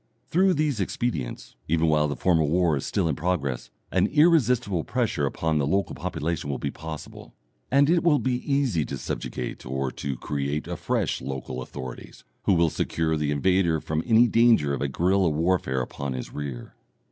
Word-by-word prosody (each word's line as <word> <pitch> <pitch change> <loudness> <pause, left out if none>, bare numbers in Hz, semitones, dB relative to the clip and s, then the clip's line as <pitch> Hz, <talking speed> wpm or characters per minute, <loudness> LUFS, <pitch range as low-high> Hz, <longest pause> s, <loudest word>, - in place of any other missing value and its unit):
Through 185 +2 +4
these 150 -6 0
expedients, 95 - -3
even 80 +1 +2
while 75 -1 +3
the 75 - -3
formal 80 -5 +2
war 85 -1 +3
is 70 - -3
still - - 0
in 75 - 0
progress, 75 -6 -2 0.2
an - - +3
irresistible 125 - +3
pressure 115 - 0
upon 80 +2 0
a - - 0
local 95 +7 0
population 80 -3 -3
will 70 - -1
be - - -3
possible, 80 -1 -9 0.3
and 140 +2 +4
it 170 +1 +3
will 165 -4 +4
be 125 +2 -2
easy 130 - +2
to - - -5
subjugate - - -5
or 65 +1 -2
to 70 -3 -4
create 70 +2 -2
afresh - - -1
local 65 -1 -5
authorities, 65 0 -8 0.2
who - - +4
will 85 -2 +3
secure 80 -1 -1
the 75 -1 -1
invader 85 +3 +2
from 80 +1 -2
any 115 +1 +6
danger 115 -11 +4
of 70 - -3
a 70 - +1
guerilla 90 +6 +2
warfare 80 -4 0
upon 70 +2 -4
his 65 - -6
rear. 70 -5 -6
80 Hz, 175 wpm, -25 LUFS, 70-110 Hz, 0.3 s, any